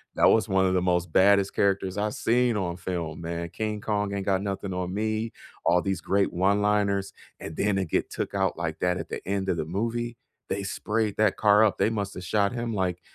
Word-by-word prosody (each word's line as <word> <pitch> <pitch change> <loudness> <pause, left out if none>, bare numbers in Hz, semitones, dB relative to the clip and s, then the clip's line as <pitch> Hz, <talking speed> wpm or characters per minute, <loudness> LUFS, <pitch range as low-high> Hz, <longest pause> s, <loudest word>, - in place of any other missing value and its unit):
That - - +5
was 110 - +3
one 95 -2 +2
of 95 - +2
the 90 - +2
most 90 -2 0
baddest 100 +2 +4
characters 95 -1 +1
I've 105 0 -1
seen 120 0 +2
on 90 -3 -2
film, 85 -4 -4
man. 85 0 -4
"King 105 0 -3
Kong 105 -2 -1
ain't 100 -1 -3
got 95 -1 +1
nothing 100 -1 -3
on 90 0 -3
me," 110 +2 -1 0.3
all 90 0 +4
these 95 0 -1
great 100 0 +1
one 100 +3 +2
liners, 100 -1 +1 0.3
and 80 - -8
then 105 -1 +1
to 95 - +1
get 80 - -1
took - - -4
out 95 -2 +1
like 80 -2 -3
that 90 0 +1
at - - -6
the - - -6
end 95 0 -1
of 85 - +1
the 80 - -2
movie. 115 +7 -2 0.3
They 100 - -2
sprayed 105 +2 -2
that 110 -2 +3
car 105 0 +5
up, 105 - +1
they - - +2
must 100 -3 -3
have 90 - -7
shot 100 +3 +1
him, 120 -1 -3
like, 90 -3 -1
100 Hz, 230 wpm, -26 LUFS, 90-105 Hz, 0.3 s, That